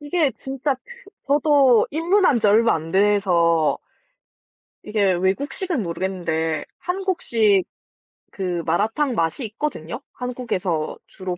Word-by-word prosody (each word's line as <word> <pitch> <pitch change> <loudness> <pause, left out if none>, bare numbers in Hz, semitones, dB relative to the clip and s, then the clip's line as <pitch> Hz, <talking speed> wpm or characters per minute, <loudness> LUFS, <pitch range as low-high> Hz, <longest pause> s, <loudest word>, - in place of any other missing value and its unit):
이게 295 0 +1
진짜 270 +1 -2 0.5
저도 280 -4 +4
입문한 330 - +2
지 215 - +2
얼마 225 +3 +4
안 160 0 -5
돼서 180 -5 +3 1.1
이게 205 -3 +1
외국식은 265 - -1
모르겠는데 165 -3 -2
한국식 335 - +1 0.7
그 180 -3 -3
마라탕 220 - 0
맛이 165 - -1
있거든요. 225 - -5
한국에서 200 -10 -3
주로 185 -2 -6
210 Hz, 235 characters per minute, -22 LUFS, 180-280 Hz, 1.1 s, 저도